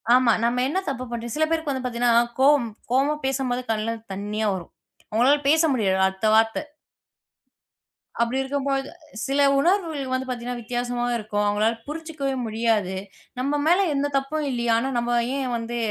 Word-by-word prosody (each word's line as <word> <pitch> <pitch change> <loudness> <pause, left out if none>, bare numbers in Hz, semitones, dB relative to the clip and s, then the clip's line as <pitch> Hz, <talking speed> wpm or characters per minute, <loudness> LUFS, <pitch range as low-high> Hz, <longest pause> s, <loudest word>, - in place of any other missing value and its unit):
ஆமா. 250 -2 +4
நம்ம 240 +1 +1
என்ன 370 - 0
தப்பு 255 -2 -4
பண்ணிட்டோம். 235 -1 -4
சில 315 - +3
பேருக்கு 320 -2 0
வந்து 260 -1 -4
பாத்தீங்கன்னா 235 -1 +3 0.2
கோவம் 275 -4 +5 0.2
கோவமா 275 +4 +3
பேசும்போது 265 -2 -1
கண்ணுல 220 +1 -1 0.2
தண்ணீயா 210 +2 -2
வரும். 175 -3 -8 0.4
உங்களால 255 +6 +4
பேச 320 +2 +5
முடியாது. 195 -6 +1
அடுத்த 190 +3 -2
வார்த்த. 225 0 +3 1.6
அப்பபிடி 235 +3 +1
இருக்கும்பொழுது 275 0 -1 0.4
சில 275 +1 0 0.2
உணர்வுகள் 320 -5 0
வந்து 260 0 -1
பாத்தீங்கன்னா 245 0 -4
வித்தியாசமா 245 +1 -2
இருக்கும். 210 -2 -2
அவுங்களால 210 +2 +2
புரிஞ்சுக்கவே 305 -3 -4
முடியாது. 220 -4 0 0.4
நம்ம 280 +3 0
மேல 350 +4 +4 0.2
எந்தத் 285 0 -1
தப்பும் 295 +3 -2
இல்லயே, 240 -2 0
ஆனா 250 +4 -1
நம்ம 240 0 +1 0.2
ஏன் 270 -2 -2
வந்து 230 +1 -4
250 Hz, 150 wpm, -24 LUFS, 230-275 Hz, 1.6 s, கோவம்